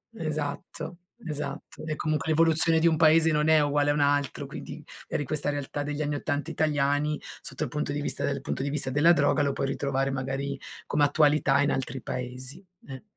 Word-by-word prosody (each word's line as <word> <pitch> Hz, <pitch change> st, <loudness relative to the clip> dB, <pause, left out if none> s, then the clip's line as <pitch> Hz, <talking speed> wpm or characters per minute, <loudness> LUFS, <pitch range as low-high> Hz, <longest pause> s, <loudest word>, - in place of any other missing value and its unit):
esatto, 155 Hz, 0 st, -4 dB, 0.3 s
esatto. 150 Hz, -3 st, -6 dB
E 155 Hz, -1 st, -2 dB
comunque 155 Hz, -1 st, -1 dB
l'evoluzione 165 Hz, +1 st, +4 dB
di 170 Hz, -, +4 dB
un 160 Hz, -, +3 dB
paese 160 Hz, 0 st, +5 dB
non 150 Hz, 0 st, +2 dB
è 160 Hz, -1 st, +6 dB
uguale 145 Hz, 0 st, +2 dB
a -, -, +2 dB
un 150 Hz, -, -1 dB
altro, 145 Hz, -2 st, +1 dB
quindi -, -, -8 dB, 0.2 s
eri -, -, -2 dB
in 140 Hz, -, -4 dB
questa 150 Hz, -1 st, -1 dB
realtà 145 Hz, 0 st, -3 dB
degli 145 Hz, +1 st, -3 dB
anni 145 Hz, -1 st, -1 dB
'80 145 Hz, +2 st, -2 dB
italiani, 150 Hz, -1 st, +1 dB, 0.2 s
sotto -, -, -5 dB
il -, -, -3 dB
punto 150 Hz, -1 st, -2 dB
di 145 Hz, +1 st, -2 dB
vista -, -, -3 dB
dal 140 Hz, -1 st, -2 dB
punto 135 Hz, -, -3 dB
di 140 Hz, -, -1 dB
vista 140 Hz, -2 st, -2 dB
della 145 Hz, +6 st, +5 dB
droga 145 Hz, -1 st, +2 dB
lo 140 Hz, -1 st, +1 dB
puoi 135 Hz, -, -1 dB
ritrovare 135 Hz, 0 st, -1 dB
magari 135 Hz, +1 st, -3 dB, 0.3 s
come 150 Hz, -, +2 dB
attualità 145 Hz, -1 st, +4 dB
in 145 Hz, -, +2 dB
altri 130 Hz, -1 st, -3 dB
paesi, 130 Hz, +6 st, -6 dB, 0.2 s
eh. 135 Hz, +2 st, -8 dB
145 Hz, 200 wpm, -27 LUFS, 140-155 Hz, 0.3 s, è